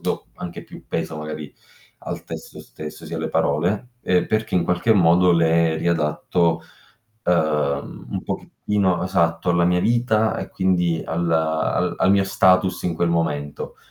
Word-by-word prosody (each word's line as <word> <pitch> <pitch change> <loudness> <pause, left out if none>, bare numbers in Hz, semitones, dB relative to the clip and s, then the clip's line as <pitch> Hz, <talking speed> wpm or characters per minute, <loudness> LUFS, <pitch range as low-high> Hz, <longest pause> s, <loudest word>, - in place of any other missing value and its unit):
do - - -3
anche 85 -1 -7
più - - -13
peso 80 -1 -3
magari 75 -1 -6 0.5
al - - -6
testo - - -8
stesso, 75 0 -9
sì - - -6
alle - - -2
parole, 90 +11 0
ehm, 90 -1 +2
perché 110 0 -1
in 85 -2 +3
qualche 90 +6 +2
modo 90 -1 +5
le 85 -1 +3
riadatto, 85 +1 0 0.6
ehm, 75 -5 0
un - - -3
pochettino 95 -4 -1
esatto, 85 -2 +1
alla 85 0 +3
mia 90 +1 +3
vita 110 0 +2
e - - -5
quindi 90 -3 +1
al 85 +1 -1
al 80 +2 +1
al 90 - +3
mio 100 -1 +4
status 95 -1 +3
in 85 - 0
quel 85 +1 +1
momento. 75 -4 -2
85 Hz, 150 wpm, -22 LUFS, 80-95 Hz, 0.6 s, modo